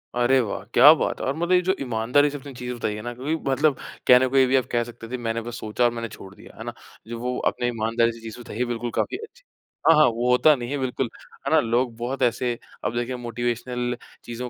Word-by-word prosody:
अरे 125 +2 +4
वाह! 100 -4 -2
क्या 150 - +9
बात - - -2
है! - - -2
और 135 - 0
मतलब 175 +2 -1
ये 180 0 +5
जो 190 +2 +1
ईमानदारी 125 +4 +2
से 145 - -6
आपने 140 0 -10
चीज़ 125 0 -5
बताई 110 -3 -2
है 105 - -6
ना 120 +2 -5
क्योंकि 140 +6 -2
मतलब 145 +1 +3 0.3
कहने 125 +1 +7
को 135 +1 0
ये 130 - +7
भी 135 - +2
आप 130 - +3
कह 120 -1 +2
सकते 115 -1 -10
थे, 125 - -2
मैंने 115 -1 -2
बस 120 +1 -7
सोचा 110 +3 -1
और 120 - +3
मैंने 115 -1 -4
छोड़ 95 0 -11
दिया, - - -15
है - - -7
ना? - - -5 0.3
जो 115 0 -6
वो 125 +1 -2
आपने 120 - -1
ईमानदारी 115 0 +1
से 115 - -12
चीज़ 115 +1 -8
बताई 115 -2 -9
है 125 - +1
बिल्कुल 120 0 -3
काफ़ी 370 - -1
अच्छी 455 +3 -12 0.5
हाँ, 165 - +8
हाँ 155 - +6
वो 120 +1 0
होता 145 +4 +5
नहीं 120 -1 -6
है, 145 - -1
बिल्कुल, 130 -2 -2 0.4
है - - 0
ना? - - +6
लोग 120 +1 0
बहुत 130 +3 -4
ऐसे 120 0 0 0.3
अब 120 - -1
देखिए 120 +1 -2
मोटिवेशनल 120 +1 -3 0.3
चीज़ों 120 +1 -6
120 Hz, 255 wpm, -24 LUFS, 115-130 Hz, 0.5 s, क्या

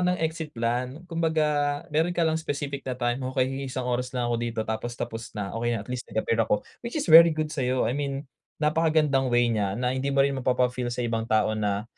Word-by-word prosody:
ng 180 - -2
exit 160 -1 -3
plan, 125 +5 -2
kumbaga 155 -3 +1
meron 160 +3 +2
ka - - 0
lang 160 0 +2
specific 140 -2 -3
na 130 - -3
time, 120 0 0
"Okey, 130 0 +1
mag-iisang 135 -2 -4
oras 125 +1 -1
na 120 -1 0
ako 120 - 0
dito, 115 -1 -2
tapos 110 +2 -3
tapos 115 0 -4
na, 100 -2 -3
okey 120 +1 0
na, 110 - -4
at - - -21
least 125 -1 -4
nag-appear 115 +1 0
ako," 105 -1 +1 0.2
which 235 - -5
is - - -3
very 165 +1 +10
good 155 -1 -1
sa'yo, 130 -3 0
I 115 - 0
mean 140 0 -3 0.3
napakagandang 155 -3 +2
way 120 -1 +3
niya 100 -3 -1
na 125 +1 0
hindi 130 +1 -2
mo 135 0 +3
rin 140 - +1
mapapa-feel 125 -1 +1
sa 120 0 -2
ibang 115 -1 -2
tao 110 0 +2
na, 105 -1 -1
130 Hz, 220 wpm, -26 LUFS, 120-150 Hz, 0.3 s, very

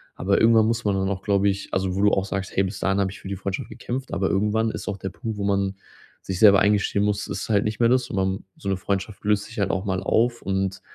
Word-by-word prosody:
Aber 100 +2 +1
irgendwann 115 -1 +5
muss 115 0 -1
man 100 -1 +2
dann 95 0 0
auch, 95 -2 -3
glaube 100 -1 +2
ich 100 +1 -3
also, 95 -1 0
wo 100 - 0
du 105 0 +5
auch 95 - +1
sagst: 95 -1 -4
„Hey, 95 - +3
bis 95 +1 -4
dahin 95 +1 +1
habe 95 -1 0
ich 100 - -11
für - - -10
die 100 - -3
Freundschaft 95 0 -4
gekämpft.“ 130 +2 -5
Aber 95 0 0
irgendwann 105 +3 +1
ist - - -7
auch 100 - -3
der 95 0 -5
Punkt, 110 +3 -6
wo 100 - -3
man 100 -1 0 0.5
sich 95 - -4
selber 100 -3 +7
eingestehen 100 0 +2
muss, 105 0 0
es - - -4
ist - - -6
halt 105 -1 +3
nicht 105 0 -3
mehr 115 -1 +4
das, 125 0 +2
und - - -4
man 95 0 -1
so 100 - -5
'ne 95 - 0
Freundschaft 100 +2 -3
löst 105 0 +1
sich 115 +1 -9
halt 100 -1 +1
auch 95 +2 -2
mal 95 -2 -1
auf 120 +1 +1
und 95 0 -2
100 Hz, 285 wpm, -24 LUFS, 95-105 Hz, 0.5 s, selber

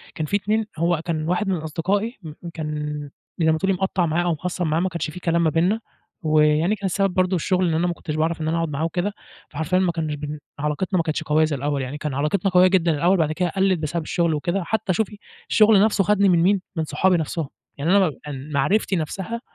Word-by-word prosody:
كان 155 - -2
فيه 200 - +1
2 215 +2 0
هو 170 0 +1
كان 155 -2 -2
واحد 180 +3 0
من 190 - +1
أصدقائي 190 - -2
م 155 -2 -7 0.2
كان 150 -2 -4 0.3
زَي 160 -1 +4
ما 160 - +1
تقولي 195 +3 +1
مقطَّع 190 -1 0
معاه 165 +2 0
أو 175 - +1
مخصَّم 175 +2 -3
معاه 155 +1 +1
ما 185 +2 0
كانش 170 -2 -3
فيه 180 - -8
كلام 170 0 +1
ما 160 - +3
بيننا، 175 +8 +1 0.4
ويعني 155 +4 +3
كان 200 -1 -7
السبب 195 0 +1
برضو 185 +1 +2
الشغل 185 +1 +1
إن - - 0
أنا 165 +3 +1
ما 175 - 0
كنتش 155 -2 -6
باعرف 160 +1 0
إن 155 - -2
أنا 165 +1 0
أقعد 165 -1 -1
معاه 145 +1 -3
وكده، 180 +5 -2 0.4
فحرفيًا 160 +4 0
ما 185 -2 +2
كانش 160 -2 -3
بن 150 +1 -6 0.2
علاقتنا 150 +6 -1
ما 165 - +2
كانتش 155 0 -2
قوية 155 +1 +3
زَي 155 -2 -2
الأول 140 +1 -1
يعني، 130 +3 -5
كان 150 -2 -4
علاقتنا 150 +8 0
قوية 180 0 +6
جدًا 180 -3 +3
الأول 170 +5 +2
وبعد 160 -4 +1
كده 175 +3 0
قلّت 190 0 +1
بسبب 155 +2 -2
الشغل 170 +1 0
وكده، 175 +5 -1
حتى 195 +1 -1
شوفي 210 +2 -2 0.3
الشغل 215 -2 +6
نفْسه 210 -2 +3
خدني 200 +1 +3
من 175 -2 +4
مين، 195 +1 +3
من 160 - 0
صحابي 180 +5 +2
نفْسهم، 160 -2 -3 0.3
يعني 165 +8 +3
أنا 190 -4 +4
م 145 -1 -8
معرفتي 190 +9 +1
نفْسها، 190 +8 -3
170 Hz, 235 wpm, -23 LUFS, 155-190 Hz, 0.4 s, قوية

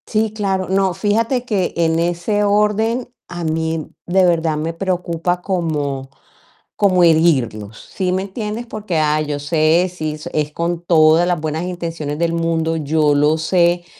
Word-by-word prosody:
Sí, 215 -1 0
claro. 195 -3 -1
No, 190 -1 +2
fíjate 225 +6 0
que 200 -7 -1
en 165 -1 +2
ese 175 +5 0
orden 210 +4 +1 0.2
a 175 -1 -6
mí 160 0 -2 0.2
de 185 +1 +3
verdad 165 -3 +1
me 160 +2 -3
preocupa 175 -1 -2
como 150 -8 -2 0.7
como 185 -3 +3
herirlos, 130 -11 +2 0.2
¿sí 185 -2 0
me 185 +1 0
entiendes? 210 +3 -5
Porque 215 -6 -4
ah, 155 0 +2
yo 150 -1 -3
sé, 160 +4 +2
si 155 -3 -4 0.2
es 150 -1 -1
con 170 +2 -2
todas 160 0 +4
las 175 -2 0
buenas 155 +1 -3
intenciones 165 -5 -4
del 170 0 0
mundo, 165 -1 0
yo 150 0 +1
lo 150 +2 +3
sé, 175 +1 +1
170 Hz, 155 wpm, -18 LUFS, 155-190 Hz, 0.7 s, todas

